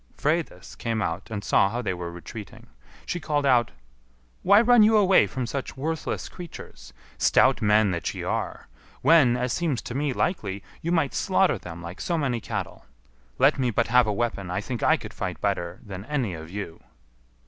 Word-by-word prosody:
Freydis 160 +3 -2
came 115 -1 -2
out 90 -2 -3
and 105 -2 -4
saw 100 - +3
how 120 - -3
they 105 -6 -2
were 85 -1 -6
retreating. 85 +5 -10 0.4
She 175 - -3
called 150 -3 -1
out, 125 -4 +4 0.7
"Why 200 +2 +6
run 240 0 +6
you 215 +1 +6
away 190 - +5
from 125 +6 -4
such 135 +2 -5
worthless 160 +4 -3
creatures, 150 - -11 0.3
stout - - +4
men 105 -1 +4
that 85 -2 -2
ye - - -6
are, - - -3 0.4
when, 140 -7 +5
as 125 -1 -1
seems 155 -8 -1
to - - -6
me 140 +2 0
likely, 100 - -2 0.2
you 170 - -2
might 160 -6 +1
slaughter 190 -1 +2
them 85 0 -9
like 85 +3 -8
so 170 - -1
many 130 -6 -1
cattle? - - -5 0.5
Let 140 +2 +4
me 125 -2 +1
but 115 +1 0
have 125 -1 +5
a - - +1
weapon, 100 -4 -2
I 90 - -1
think 120 +2 -5
I - - +4
could - - -9
fight - - -4
better 85 +1 -2
than 95 -2 -7
any 125 -8 -1
of 80 0 -8
you." 95 -3 -7
120 Hz, 190 wpm, -25 LUFS, 100-150 Hz, 0.7 s, Why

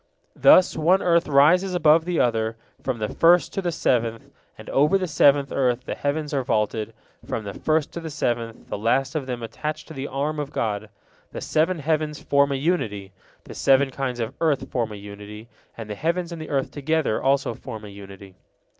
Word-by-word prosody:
Thus 185 - +6
one 175 +5 +3
earth 170 -1 +3
rises 170 +7 +4
above 160 -1 +4
the 175 -1 -1
other, 115 -2 0 0.2
from 130 -3 -2
the 110 -1 -2
first 175 +1 +4
to 195 - -2
the 175 -2 -1
seventh, 115 -7 -1 0.3
and - - -12
over 150 +8 +4
the 190 - -2
seventh 145 -3 +3
earth 125 -2 0
the - - -3
heavens 150 +1 -2
are 140 - +1
vaulted, 110 -1 -1 0.3
from 110 - -4
the 100 -1 -6
first 155 +4 0
to - - -6
the 165 -1 -6
seventh, 120 -6 -3
the - - -4
last 125 +6 +1
of 150 -5 -3
them 120 -2 -4
attached 150 +7 -5
to - - -8
the 135 -1 -5
arm 145 +3 -2
of 145 -1 -4
God. 105 -1 -2 0.4
The - - -5
seven 165 +3 +1
heavens 155 0 -1
form 140 0 +2
a - - 0
unity, 110 - -2 0.3
the - - -10
seven 135 0 +3
kinds 130 -2 -3
of 115 +2 -3
earth 155 -4 0
form 115 -3 -1
a - - -6
unity, 105 +2 -10 0.3
and 115 -2 -7
the 105 - -5
heavens 170 - -2
and 170 -2 -6
the 155 - -8
earth 135 -2 -1
together 145 -4 -1
also 135 -2 +1
form 110 -1 -9
a - - -9
unity. 100 -1 -12
140 Hz, 200 wpm, -23 LUFS, 115-155 Hz, 0.4 s, Thus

